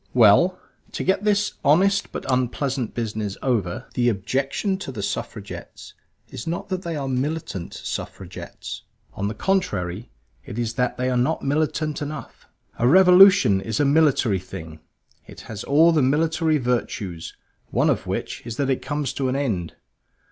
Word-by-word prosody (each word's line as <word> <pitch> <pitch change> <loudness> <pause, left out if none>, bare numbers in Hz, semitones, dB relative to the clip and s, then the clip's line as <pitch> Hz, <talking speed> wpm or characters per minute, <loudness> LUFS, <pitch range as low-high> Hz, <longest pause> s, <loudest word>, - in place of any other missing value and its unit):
Well, 125 - +5 0.3
to - - -3
get 190 +2 +1
this 210 0 +2
honest 195 +8 +3
but - - -6
unpleasant 130 -1 -1
business 110 -3 -3
over, 110 -10 -1
the 120 -1 +2
objection 135 - -1
to 135 - -6
the 105 -6 -5
Suffragettes - - -6 0.4
is 115 - -8
not 170 +3 -3
that 185 -1 -2
they 170 -3 -4
are 140 -2 -3
Militant 135 - -3
Suffragettes. 95 -2 -7 0.3
On 100 - -2
the 110 - -4
contrary, 105 - -1 0.3
it 120 -5 -8
is 115 -1 -1
that 125 0 -1
they 125 +1 0
are - - 0
not 125 +1 0
militant 155 +1 -1
enough. 145 -4 -7 0.3
A 120 - +3
revolution 185 - +7
is 110 +2 -3
a 145 - +3
military 140 -9 +3
thing; 80 -3 -9 0.5
it - - -11
has 110 -1 -7
all 160 +4 +5
the 160 -3 +3
military 155 +3 +2
virtues; 110 - -3 0.3
one - - +2
of - - 0
which - - -3
is 115 0 -6
that 135 -1 +1
it 130 - -1
comes 145 -2 -2
to 135 -2 -1
an 130 - -1
end. 105 - -2
130 Hz, 160 wpm, -23 LUFS, 110-160 Hz, 0.5 s, revolution